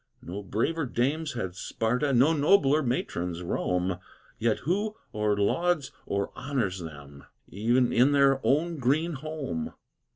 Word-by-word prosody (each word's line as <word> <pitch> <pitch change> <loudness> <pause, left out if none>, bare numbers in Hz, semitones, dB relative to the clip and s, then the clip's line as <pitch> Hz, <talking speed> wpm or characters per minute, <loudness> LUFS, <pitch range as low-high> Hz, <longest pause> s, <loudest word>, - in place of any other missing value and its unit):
No 95 +4 -6
braver 130 - -1
dames 140 +6 -1
had 95 -7 -3
Sparta, 125 +9 -1
No 135 +5 +5
nobler 150 -1 +4
matrons 90 - -2
Rome, 90 +1 -1 0.4
Yet 115 -1 +2
who 205 +8 -1 0.2
or 105 -1 +1
lauds 155 +7 +1 0.2
or 100 0 -1
honors 125 -9 -2
them, 70 -4 -10 0.3
E'en 120 +5 +2
in 130 +4 +5
their 140 -1 +4
own 160 +3 +1
green 155 +7 +1
home! 140 - -4
125 Hz, 130 wpm, -28 LUFS, 100-150 Hz, 0.4 s, No